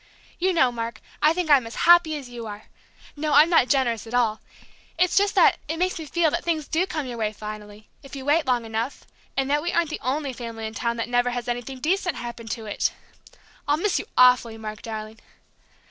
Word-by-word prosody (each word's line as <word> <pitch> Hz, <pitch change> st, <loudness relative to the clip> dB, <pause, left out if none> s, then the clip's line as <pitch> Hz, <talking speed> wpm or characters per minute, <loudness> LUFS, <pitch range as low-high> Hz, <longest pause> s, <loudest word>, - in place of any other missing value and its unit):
"You 375 Hz, +2 st, +2 dB
know, 260 Hz, -8 st, +3 dB
Mark, 230 Hz, -1 st, -5 dB, 0.2 s
I 305 Hz, -, +5 dB
think 335 Hz, -2 st, -1 dB
I'm 265 Hz, -5 st, +5 dB
as 230 Hz, -, -9 dB
happy 345 Hz, -3 st, +6 dB
as 275 Hz, -3 st, -8 dB
you 240 Hz, -2 st, -8 dB
are 210 Hz, 0 st, -8 dB, 0.5 s
no, 300 Hz, 0 st, -1 dB
I'm 305 Hz, +4 st, +6 dB
not 325 Hz, -7 st, +5 dB
generous 240 Hz, -5 st, +1 dB
at 235 Hz, -, -4 dB
all! 225 Hz, -3 st, +1 dB, 0.6 s
It's 360 Hz, +1 st, +2 dB
just 405 Hz, 0 st, +3 dB
that -, -, +5 dB
it 320 Hz, +2 st, -3 dB
makes 365 Hz, 0 st, 0 dB
me 315 Hz, -, -7 dB
feel 325 Hz, +1 st, +2 dB
that 340 Hz, -, -2 dB
things 315 Hz, -3 st, -1 dB
do 345 Hz, +4 st, 0 dB
come 310 Hz, -6 st, -3 dB
your 245 Hz, -2 st, -6 dB
way 215 Hz, -1 st, 0 dB
finally, 210 Hz, 0 st, -9 dB
if 275 Hz, 0 st, -11 dB
you 265 Hz, -1 st, -7 dB
wait 300 Hz, +1 st, +2 dB
long 245 Hz, -2 st, +1 dB
enough, 225 Hz, +4 st, -4 dB, 0.3 s
and 270 Hz, -1 st, +1 dB
that 295 Hz, +1 st, +2 dB
we 345 Hz, +3 st, -2 dB
aren't 335 Hz, -2 st, +1 dB
the -, -, -5 dB
only 275 Hz, +1 st, -2 dB
family 230 Hz, -2 st, -6 dB
in 220 Hz, -, -5 dB
town 235 Hz, +1 st, -2 dB
that 230 Hz, -, -2 dB
never 245 Hz, 0 st, +1 dB
has 245 Hz, -1 st, -4 dB
anything 245 Hz, +2 st, -4 dB
decent 360 Hz, +2 st, 0 dB
happen 235 Hz, -1 st, -7 dB
to 225 Hz, 0 st, -5 dB
it!... 210 Hz, -, -1 dB, 0.8 s
I'll 290 Hz, +1 st, +3 dB
miss 375 Hz, +3 st, 0 dB
you -, -, -7 dB
awfully, 250 Hz, -3 st, +5 dB
Mark, 215 Hz, -1 st, -7 dB
darling!... 220 Hz, 0 st, -7 dB
255 Hz, 225 wpm, -24 LUFS, 230-315 Hz, 0.8 s, happy